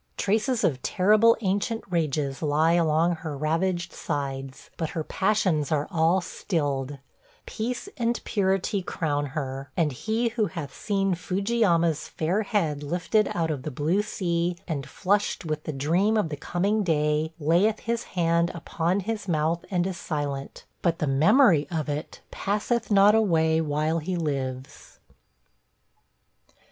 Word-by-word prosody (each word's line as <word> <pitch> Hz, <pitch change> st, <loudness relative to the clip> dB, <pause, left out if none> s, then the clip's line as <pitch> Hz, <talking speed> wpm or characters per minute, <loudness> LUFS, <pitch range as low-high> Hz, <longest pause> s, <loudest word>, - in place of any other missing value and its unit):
Traces 220 Hz, +4 st, +1 dB
of 130 Hz, -5 st, +1 dB
terrible 215 Hz, +4 st, +4 dB
ancient 205 Hz, +3 st, -1 dB
rages 150 Hz, -6 st, -1 dB
lie 155 Hz, +1 st, +2 dB
along 165 Hz, 0 st, +2 dB
her 155 Hz, -3 st, -6 dB
ravaged 175 Hz, +4 st, -1 dB
sides; 135 Hz, -2 st, -5 dB
but 160 Hz, -2 st, -3 dB
her 160 Hz, -, -3 dB
passions 185 Hz, -6 st, +1 dB
are 150 Hz, -1 st, +1 dB
all 170 Hz, +2 st, +3 dB
stilled, 145 Hz, -6 st, -2 dB, 0.5 s
peace 240 Hz, -, -4 dB
and 235 Hz, -1 st, 0 dB
purity 195 Hz, -1 st, 0 dB
crown 145 Hz, -5 st, -2 dB
her; 135 Hz, -1 st, -5 dB
and 160 Hz, -4 st, +2 dB
he 220 Hz, -, -1 dB
who 225 Hz, -2 st, 0 dB
hath 160 Hz, -8 st, -7 dB
seen 195 Hz, -2 st, 0 dB
Fuji 195 Hz, +6 st, -2 dB
yama's 170 Hz, -7 st, +2 dB
fair 175 Hz, +7 st, -1 dB
head 170 Hz, -9 st, -1 dB
lifted 180 Hz, +8 st, +1 dB
out 165 Hz, -2 st, 0 dB
of 145 Hz, -4 st, -3 dB
the 155 Hz, -, -4 dB
blue 155 Hz, +8 st, +1 dB
sea 175 Hz, -3 st, -1 dB
and 140 Hz, -5 st, -4 dB
flushed 200 Hz, -1 st, 0 dB
with 155 Hz, -1 st, -3 dB
the -, -, -2 dB
dream 170 Hz, +10 st, +1 dB
of 205 Hz, -7 st, +1 dB
the 150 Hz, -, -3 dB
coming 195 Hz, +8 st, 0 dB
day 155 Hz, -3 st, +1 dB
layeth 175 Hz, +8 st, +2 dB
his 235 Hz, 0 st, -2 dB
hand 170 Hz, 0 st, +2 dB
upon 170 Hz, +3 st, -1 dB
his 210 Hz, +1 st, -4 dB
mouth 165 Hz, 0 st, 0 dB
and 180 Hz, -2 st, +1 dB
is 185 Hz, -2 st, -3 dB
silent, 145 Hz, -4 st, -4 dB, 0.2 s
but 170 Hz, -2 st, +1 dB
the 155 Hz, -, -1 dB
memory 155 Hz, -, +4 dB
of 160 Hz, -3 st, -2 dB
it 150 Hz, +2 st, -5 dB
passeth 210 Hz, +4 st, -1 dB
not 200 Hz, 0 st, +6 dB
away 160 Hz, -7 st, +3 dB
while 155 Hz, +2 st, 0 dB
he 180 Hz, +4 st, -3 dB
lives. 135 Hz, -5 st, -4 dB
170 Hz, 145 wpm, -26 LUFS, 150-200 Hz, 0.5 s, not